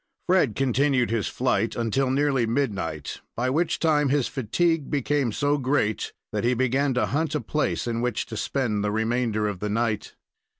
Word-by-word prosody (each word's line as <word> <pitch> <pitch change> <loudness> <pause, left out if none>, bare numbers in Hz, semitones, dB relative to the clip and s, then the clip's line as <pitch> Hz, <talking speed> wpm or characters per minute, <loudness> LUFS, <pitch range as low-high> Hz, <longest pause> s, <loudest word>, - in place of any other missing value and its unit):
Fred 175 - +3
continued 135 -2 +2
his 115 -3 0
flight 120 -3 0
until 120 +3 0
nearly 135 -3 +2
midnight, 100 - -2
by 125 +2 0
which 165 +5 +1
time 150 -3 +2
his 140 -2 +2
fatigue 155 +5 0
became 140 -3 0
so 145 +5 +1
great 130 -6 0 0.2
that 105 -1 -2
he 125 +1 +2
began 130 +2 +1
to 125 - +2
hunt 155 +1 -1
a - - +1
place 150 +1 -1
in 115 -1 -2
which 120 -1 -1
to 115 - -8
spend 110 -2 -1
the 105 - +1
remainder 110 0 0
of 100 -3 -4
the 105 - -2
night. 110 0 -1
125 Hz, 175 wpm, -25 LUFS, 110-145 Hz, 0.2 s, Fred